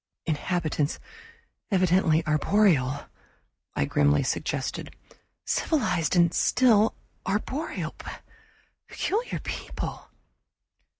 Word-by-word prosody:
"Inhabitants 155 -2 -1 0.7
evidently 180 -4 +3
arboreal," 155 -4 +2 0.7
I - - +1
grimly 70 +1 +3
suggested. - - -3 0.5
"Civilized 215 - +1
and 170 -1 +4
still 225 -4 +4 0.3
arboreal 260 +10 -2 0.9
peculiar 455 +5 -2
people." - - -5
175 Hz, 65 wpm, -27 LUFS, 155-215 Hz, 0.9 s, and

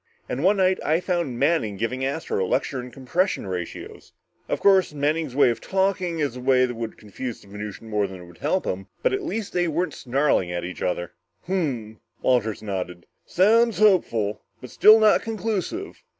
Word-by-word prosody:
And 135 - -3
one 200 +3 +4
night 185 0 +3
I 160 +2 +2
found 170 -9 -2
Manning 135 -8 +1
giving 125 +5 -2
Astro 135 -7 -1
a - - -2
lecture 135 - -1
in 125 - -9
compression 135 - -1
ratios. 90 -3 -7 0.4
Of - - -1
course, 190 -5 +4
Manning's 150 -1 -1
way 140 -4 +5
of 115 - -5
talking 190 -3 0
is 145 -5 -1
a - - -6
way 130 0 +4
that 125 - -4
would 115 -1 -6
confuse 115 +3 -7
the - - -18
Venusian 105 +2 -8
more 105 -2 0
than 95 -1 -9
it 90 - -11
would 85 -1 -16
help 185 - 0
him, 95 +1 -3 0.2
but - - +2
at 395 - 0
least 225 - -4
they 175 -1 +1
weren't 165 0 -1
snarling 130 -8 +1
at 85 0 -3
each 90 - -7
other." 90 -1 -2 0.3
"Hmm," 135 - -2 0.3
Walters 115 -5 +1
nodded. 90 -4 -5 0.2
"Sounds 225 +5 +4
hopeful, 115 - +2 0.2
but 125 - -10
still 215 +1 +7
not 215 -1 +5
conclusive. 225 - -3
135 Hz, 190 wpm, -24 LUFS, -, 0.4 s, still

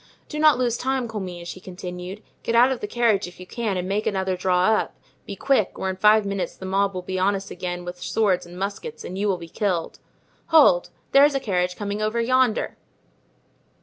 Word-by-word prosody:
Do 300 - -5
not 305 -3 +6
lose 240 -2 0
time, 260 -1 -1
Comminges," 180 -6 -6
he - - -12
continued; 180 +2 -8 0.2
"get 230 - -1
out 245 +3 +6
of 260 - -2
the 210 - -4
carriage 215 -4 +1
if 175 - -13
you 180 - -9
can 215 -1 -2
and 180 0 -3
make 200 +2 -1
another 190 -2 0
draw 180 0 +1
up; 220 - +1 0.3
be 200 - -5
quick, 240 -2 +1
or 190 - -1
in - - -6
five 210 +2 +5
minutes 200 -1 -3
the 190 - -8
mob 195 +1 +1
will 180 - -4
be 185 +1 -3
on 200 +2 +2
us 195 0 -6
again 175 0 -5
with 175 0 -7
swords 195 -6 +1
and 175 +1 -11
muskets 200 - -5
and 185 - -6
you 205 - +1
will 190 -2 +1
be 170 -1 -9
killed. 175 -1 -2 0.5
Hold! 300 - +5 0.2
there's 285 +1 +6
a - - +2
carriage 180 -6 -1
coming 205 0 -4
over 215 +2 0
yonder." 250 -1 +1
200 Hz, 215 wpm, -24 LUFS, 180-230 Hz, 0.5 s, not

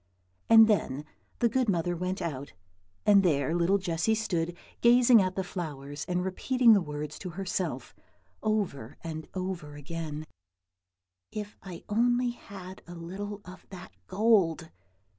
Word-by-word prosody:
And 225 -1 +9
then 150 -9 0 0.3
the 235 - +3
good 245 0 +1
mother 175 -1 0
went 180 +3 -3
out, 140 - -5 0.5
and 205 -1 +7
there 155 -4 +1
little 175 +3 +3
Jessy 180 +3 0
stood, 175 -6 -2 0.2
gazing 240 -1 +7
at 185 -1 -1
the 190 - -1
flowers, 145 -6 -6
and 180 0 -1
repeating 235 +5 +4
the 200 - +4
words 150 -1 -5
to 185 - -6
herself, 175 -7 -3 0.5
over 195 - -2
and 160 -2 -6
over 180 -6 -4
again, 155 +1 -5 1.1
"If 210 -1 -6
I 180 -3 -9
only 240 +3 +2
had 190 -5 -10
a 175 - -9
little 200 +5 -6
of 185 +1 -12
that 185 -1 -10 0.2
gold!" 185 -6 +2
185 Hz, 140 wpm, -29 LUFS, 165-210 Hz, 1.1 s, And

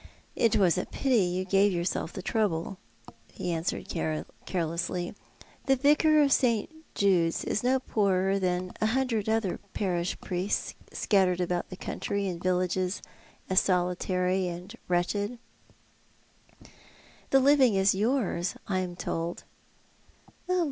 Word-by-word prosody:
" - - -35
It 225 - +3
was 185 -4 +3
a - - -4
pity 265 -3 +1
you 180 +1 -1
gave 195 +2 +3
yourself 170 -1 -2
the 190 - -7
trouble," 190 -4 -1 0.5
he 175 - -4
answered 165 +1 -2 0.6
carelessly. 175 0 -2 0.5
"The 270 0 +4
Yicar 300 +2 +4
of 275 - 0
St. 235 -1 +2 0.2
Jude's 180 -5 +2
is 210 - -1
no 260 +1 +3
poorer 195 -5 +1
than 180 -1 -1
a 215 - +3
hundred 230 -5 0
other 220 -4 0 0.2
jDarish 180 -3 -1
priests 185 +2 -2 0.2
scattered 185 -3 +2
about 180 -1 -1
the 185 - -8
country 200 +1 -3
in 180 -3 -3
villages 185 +1 0 0.4
as 185 - +5
solitary 180 0 0
and 175 +1 -7
wretched." 200 +6 0 1.0
" - - -25
The 270 - +5
living 265 -4 +5
is 195 +1 +4
yours, 205 -4 0
I 190 -2 0
am 180 -1 -4
told." 170 0 -3
185 Hz, 130 wpm, -28 LUFS, 180-215 Hz, 1.0 s, as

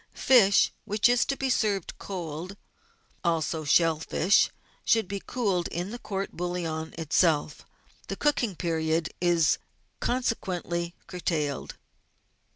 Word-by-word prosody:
Fish 210 -7 +5
which 210 +1 +2
is 245 0 +3
to 275 - -1
be 270 - -1
served 200 -6 0
cold, 180 0 -6 0.7
also 165 -2 0
shell 160 +1 +3
fish, 175 +4 +3 0.3
should 200 -3 0
cool 200 -8 0
in 175 +4 -3
the 240 - -6
court 195 -3 -4
bouillon 170 -3 -3
itself; 160 -1 +1 0.4
the - - -3
cooking 250 -9 +1
period 160 -1 0
is 170 -3 +3 0.4
conse 250 -1 +1
quently 175 -4 -4
curtailed. 155 -6 -2
175 Hz, 115 wpm, -27 LUFS, 165-200 Hz, 0.7 s, Fish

